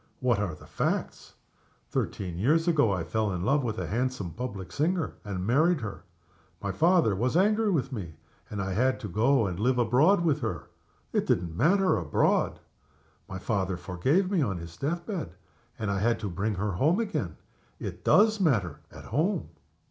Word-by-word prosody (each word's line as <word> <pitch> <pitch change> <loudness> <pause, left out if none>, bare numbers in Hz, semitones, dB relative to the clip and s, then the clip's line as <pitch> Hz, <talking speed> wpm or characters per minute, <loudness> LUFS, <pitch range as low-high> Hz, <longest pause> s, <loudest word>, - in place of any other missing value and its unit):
What 120 -4 +2
are 95 -6 -2
the - - -15
facts? - - -3 0.6
Thirteen 90 -3 -3
years 160 - +2
ago 145 -11 +3
I 90 -4 -1
fell 105 +5 -1
in 90 -1 -3
love 135 +6 +2
with 110 -3 -2
a - - -2
handsome 125 -5 -2
public 100 -6 -6
singer, 165 +3 0
and 95 -4 -4
married 155 - +3
her. 105 -2 -6 0.5
My 100 - -3
father 165 - +3
was 125 - +1
angry 215 +3 +3
with 140 -7 0
me; 90 - -6 0.3
and 100 -2 -3
I 95 0 -2
had 130 +6 +1
to 105 - -4
go 115 +6 +2
and 90 -2 -3
live 125 +4 +2
with 120 -2 +1 0.5
her - - -2
abroad. - - -11 0.5
It - - +1
didn't 85 -2 0
matter, 185 - +3
abroad. 80 -5 +1 0.7
My 95 - -5
father 95 -2 -1
forgave 135 - 0
me 185 -5 +2
on 100 -9 0
his 85 0 -9
death 170 - -2
bed, 165 - -5 0.4
and 105 -2 -2
I 100 - 0
had 115 +3 +1
to 105 - -2
bring 100 +5 -1
her 105 +2 -1
home 150 - +2
again. 220 -3 -2 0.4
It - - -6
does 215 0 +5
matter, 105 - +1
at - - -11
home. 175 +4 0
115 Hz, 180 wpm, -28 LUFS, 95-155 Hz, 0.7 s, does